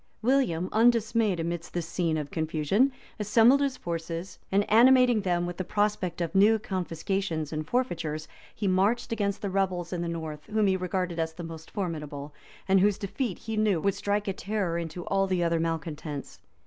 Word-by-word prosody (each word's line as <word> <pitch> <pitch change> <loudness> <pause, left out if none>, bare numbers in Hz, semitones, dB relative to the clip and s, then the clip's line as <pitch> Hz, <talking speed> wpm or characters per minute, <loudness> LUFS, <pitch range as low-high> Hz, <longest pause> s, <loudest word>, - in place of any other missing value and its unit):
William, 220 -10 +2
undismayed 225 -4 +3
amidst 170 +1 -4
this 175 -2 -1
scene 165 -2 0
of 150 -2 -4
confusion, 160 - +1 0.3
assembled. 230 +6 +5
his 275 -2 0
forces, 170 +1 -5
and 200 +1 +2
animating 245 0 +6
them 175 -3 0
with 175 0 -5
the 185 - -2
prospect 205 -3 -1
of 170 - -2
new 205 +3 +5
confiscations 185 -4 -3
and 155 0 -3
forfeitures, 165 -11 -1 0.3
he 205 - -2
marched 195 +7 +2
against 205 -3 -1
the 200 - -1
rebels 185 -2 -1
in 175 - -2
the 170 - -2
north, 160 -3 -5
whom 215 0 +1
he 190 -1 +3
regarded 180 -2 -2
as 160 0 -1
the 175 - -8
most 160 -1 -8
formidable, 150 -7 -5 0.3
and 195 0 +5
whose 200 +1 +3
defeat, 200 +1 -3
he 225 -1 -5
knew, 215 -5 +2
would 200 +4 +1
strike 205 +1 -1
a 195 - 0
terror 195 -3 -2
into 170 +1 -4
all 195 0 +1
the 185 -2 +1
other 170 -1 +1
malecontents. 160 -3 -4
185 Hz, 180 wpm, -28 LUFS, 165-210 Hz, 0.3 s, animating